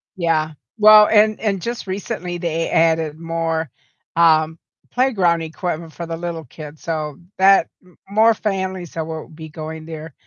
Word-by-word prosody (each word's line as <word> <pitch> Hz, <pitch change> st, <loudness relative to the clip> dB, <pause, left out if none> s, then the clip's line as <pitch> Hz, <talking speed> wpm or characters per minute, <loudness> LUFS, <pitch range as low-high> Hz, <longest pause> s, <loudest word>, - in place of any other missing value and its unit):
Yeah. 160 Hz, -3 st, 0 dB, 0.3 s
Well, 215 Hz, 0 st, +8 dB
and 215 Hz, 0 st, +4 dB
and 200 Hz, -4 st, -1 dB
just 235 Hz, -3 st, -5 dB
recently 180 Hz, -2 st, -4 dB
they 165 Hz, -1 st, -2 dB
added 160 Hz, -1 st, +1 dB
more, 165 Hz, -2 st, -2 dB, 0.5 s
um, 160 Hz, -1 st, +4 dB, 0.3 s
playground 195 Hz, -10 st, +2 dB
equipment 160 Hz, 0 st, -5 dB
for 170 Hz, -, -6 dB
the 165 Hz, 0 st, -5 dB
little 170 Hz, -2 st, -5 dB
kids, 150 Hz, +3 st, -11 dB
so, 155 Hz, -3 st, -4 dB, 0.2 s
that 195 Hz, +1 st, +5 dB, 0.2 s
m 180 Hz, -1 st, -23 dB
more 220 Hz, +2 st, +4 dB
families 190 Hz, -4 st, -3 dB
that 160 Hz, -1 st, -3 dB
will 160 Hz, -1 st, -6 dB
be 160 Hz, 0 st, -10 dB
going 160 Hz, 0 st, -7 dB
there. 160 Hz, -2 st, -8 dB
165 Hz, 150 wpm, -20 LUFS, 160-190 Hz, 0.5 s, Well